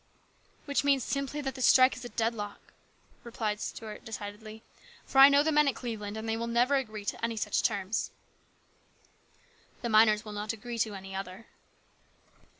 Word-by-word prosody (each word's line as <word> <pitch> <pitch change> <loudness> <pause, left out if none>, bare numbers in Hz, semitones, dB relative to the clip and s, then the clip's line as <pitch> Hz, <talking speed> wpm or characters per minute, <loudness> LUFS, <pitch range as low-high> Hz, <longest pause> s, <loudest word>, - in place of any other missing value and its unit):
"Which 285 -1 0
means 275 -3 +3
simply 275 +3 -3
that 270 -2 -3
this 260 -1 +1
strike 255 0 +6
is 250 - -10
a 245 - -6
deadlock," 220 -2 -4 0.5
replied 220 -3 -3
Stuart 215 -2 -7
decidedly; 215 0 -8 0.2
" - - -23
for 270 - +1
I 270 +1 +11
know 285 +1 +5
the 315 - +1
men 300 -1 +4
at 275 - +1
Cleveland, 215 -3 -5
and 220 +1 -5
they 225 - 0
will 230 +1 -3
never 240 +4 +2
agree 215 -7 -2
to - - -4
any 230 -1 -1
such 210 -1 0
terms." 200 -2 -1 1.7
"The 235 - -1
miners 215 -1 +5
will 210 - -7
not 210 +2 -3
agree 235 +2 -7
to 215 -2 0
any 195 0 -9
other." 195 +3 -7
225 Hz, 175 wpm, -29 LUFS, 210-255 Hz, 1.7 s, I